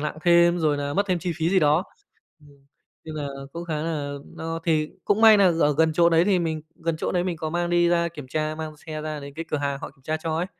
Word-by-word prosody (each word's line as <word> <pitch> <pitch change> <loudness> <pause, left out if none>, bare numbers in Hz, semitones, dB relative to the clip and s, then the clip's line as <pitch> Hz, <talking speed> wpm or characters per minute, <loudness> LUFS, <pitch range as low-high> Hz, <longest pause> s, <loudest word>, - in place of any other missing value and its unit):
nặng 150 +1 -4
thêm, 170 0 +5
rồi 155 -3 +1
là 145 0 -3
mất 200 +1 +1
thêm 185 -3 0
chi 175 0 -3
phí 165 0 0
gì 195 - +4
đó. 155 +2 +3 0.6
Ừm, 150 -1 -19 0.5
nên 155 -1 -8
là 145 -2 -3 0.3
cũng 170 +1 -6
khá 160 -2 -3
là 145 -3 -3 0.2
no 165 0 -4
thì 155 -2 +1 0.2
cũng 205 +2 +2
may 220 -1 +8
nà 200 - +5 0.2
ở 145 - +4
gần 160 0 +3
chỗ 170 +1 +4
đấy 165 +1 +4
thì 190 -3 +3
mình 160 -2 -2
gần 165 -1 -3
chỗ - - -2
đấy 175 -1 +1
mình 180 -2 -3
có 155 0 -3
mang 175 +1 -1
đi 175 0 +3
ra 170 -1 +2
kiểm 150 -5 -10
tra, 155 +3 -2
mang 155 -1 -6
xe 155 0 -7
ra 155 -1 -4
đến 140 0 -9
cái 165 +3 -6
cửa - - 0
hàng 140 -1 -2
họ - - -6
kiểm 135 - -28
tra 155 +3 -2
cho 160 -1 -1
ấy, 170 - 0
160 Hz, 280 wpm, -24 LUFS, 155-175 Hz, 0.6 s, may